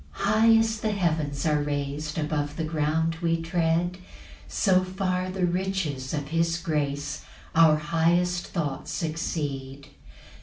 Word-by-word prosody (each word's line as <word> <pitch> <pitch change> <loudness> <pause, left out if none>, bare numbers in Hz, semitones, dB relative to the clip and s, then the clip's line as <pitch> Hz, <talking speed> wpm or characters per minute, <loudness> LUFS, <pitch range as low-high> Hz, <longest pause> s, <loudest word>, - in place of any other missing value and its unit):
3 195 - -5
High 220 +2 +5
as 225 -1 +1
the 215 -1 0
heavens 155 -7 -1
are 150 -2 +2
rais'd 145 +1 -3
Above 150 -1 -1
the 165 - -1
ground 160 +1 0
we 165 -1 +1
tread, 170 +1 0 0.5
So 185 -3 +3
far 185 0 -1
the 185 -1 0
riches 175 -7 -2
of 145 -2 -3
his 165 +1 +1
grace 145 -3 -2 0.3
Our 160 -2 +6
highest 170 +3 +1
thoughts 160 0 -3
exceed. 140 -4 -4
165 Hz, 130 wpm, -26 LUFS, 150-180 Hz, 0.5 s, Our